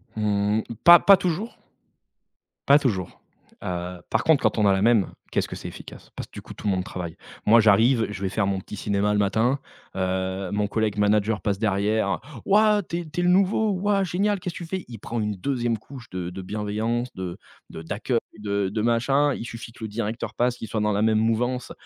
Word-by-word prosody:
Mmh, 105 0 +1 0.2
pas 175 0 +10
pas 200 -1 +7
toujours 185 +7 -3 1.1
pas 140 +1 +7
toujours, 100 -11 -2 0.4
heu, 90 0 -4
par - - +1
contre 160 -3 +4
quand - - +1
on 105 - +3
a 100 - +5
la 95 - 0
même, 110 -3 +3 0.2
qu'est-ce - - 0
que - - -7
c'est - - -7
efficace! - - -11
Parce - - -6
que - - -44
du - - -8
coup - - -11
tout - - -9
le 100 - +3
monde 90 0 -2
travaille. 90 -3 -6 0.3
Moi 115 +2 +7
j'arrive, 110 +3 +4
je 105 - -6
vais 95 - 0
faire 100 +1 0
mon 95 -1 -1
petit 105 - -9
cinéma 100 +1 0
le 105 - +1
matin, 110 +7 +2 0.4
heu, 95 0 -2
mon 105 0 +1
collègue 105 -1 -1
manager 105 +1 +2
passe 100 -2 -1
derrière: 100 0 0 0.2
«Waouh! 210 +1 +4
Tu 170 -1 -4
es 175 - -4
tu 155 - -4
es - - 0
le 175 - +2
nouveau, 200 +3 +3
waouh, 195 +1 +1
génial! 200 +4 0
Qu'est-ce 180 -1 -5
que 175 - -6
tu - - -8
fais?» 190 +2 -4
Il 115 -2 -8
prend 115 +3 -5
une 105 -1 -1
2e 120 +2 -1
couche 125 +1 -12
de 90 -1 -4
de 95 +1 -7
bienveillance, 110 +5 -2
de 90 -2 -6 0.3
de - - -8
d'accueil, 110 +8 -1 0.2
de 100 -2 -1
de 105 +2 -2
machin, 135 +5 +2
il - - -6
suffit 115 -1 -8
que 115 - -16
le - - -3
directeur 110 +1 -4
passe, 125 +2 +1
qu'il 115 - -7
soit 110 0 -2
dans 105 0 +1
la 100 - 0
même 110 -1 +3
mouvance: 120 +3 0
110 Hz, 220 wpm, -24 LUFS, 100-130 Hz, 1.1 s, pas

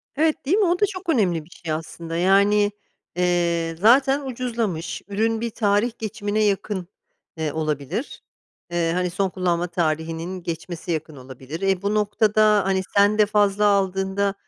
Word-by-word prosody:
Evet, 310 0 +1
değil 345 +9 +2
mi? 420 - +3
O 355 +1 +1
da 415 - +5
çok 375 -3 -7
önemli 180 - +1
bir 170 - -21
şey 165 -2 -7
aslında. 165 +1 -5
Yani, 200 +3 +4 0.4
eee, 170 -2 +1
zaten 270 +7 +5
ucuzlamış. 230 -9 -3
Ürün 220 +2 0
bir 235 - -1
tarih 210 +1 +1
geçimine 215 -1 -2
yakın, 195 -2 -1 0.5
eee, 155 -2 -2
olabilir. 155 - -3 0.5
Eee, 170 -1 0
hani 180 0 0
son 190 +2 -1
kullanma 180 -2 -1
tarihinin 165 +2 -2
geçmesi 170 +1 -5
yakın 155 -2 -3
olabilir. 130 +5 -9
E, 195 -1 +1
bu 200 +1 -1
noktada 210 -1 +3
hani 190 -1 +1 0.2
sen 205 +1 +5
de 210 - +5
fazla 205 0 +2
aldığında 195 0 +1
195 Hz, 155 wpm, -23 LUFS, 170-215 Hz, 0.5 s, da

